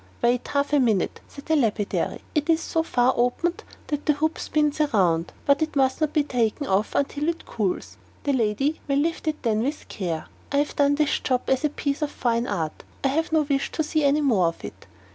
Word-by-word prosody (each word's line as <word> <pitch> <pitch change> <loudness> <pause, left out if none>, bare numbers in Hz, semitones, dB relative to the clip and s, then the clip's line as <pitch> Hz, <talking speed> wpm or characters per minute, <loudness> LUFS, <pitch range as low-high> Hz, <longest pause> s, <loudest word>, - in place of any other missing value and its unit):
"Wait 240 +1 +2
half 285 +1 0
a 290 - +5
minute," 220 -8 +1
said 280 - -12
the 320 - +2
lapidary; 220 -7 0
"it 300 +1 0
is 325 -1 +4
so 325 0 0
far 255 -5 +2
opened 250 +9 0 0.2
that 295 -1 -4
the 300 - +5
hoop 315 +3 -1
spins 300 -1 0
round, 170 -4 +2
but 280 +1 +3
it 315 -1 -1
must 265 +1 +2
not 310 -1 +2
be 305 -2 +2
taken 250 0 0
off 195 +1 0
until 290 +2 0
it 335 - -4
cools. 200 -5 -3 0.3
The 285 - +1
lady 260 +5 0
may 275 - +1
lift 320 +3 0
it 305 -1 -2
then 220 -3 +1
with 285 +5 -3
care. 170 -5 -3 0.3
I 280 - +1
have 290 +1 0
done 285 0 +3
this 295 0 +1
job 255 -1 0
as 265 +2 +2
a 300 - +3
piece 285 0 -2
of 300 - 0
fine 235 -3 0
art; 160 -6 -3 0.2
I 275 - +3
have 320 +5 0
no 315 -1 +3
wish 275 -1 -1
to 315 - 0
see 310 0 0
any 285 +2 +3
more 220 - +3
of 165 - -4
it." - - -10
280 Hz, 220 wpm, -24 LUFS, 235-300 Hz, 0.3 s, a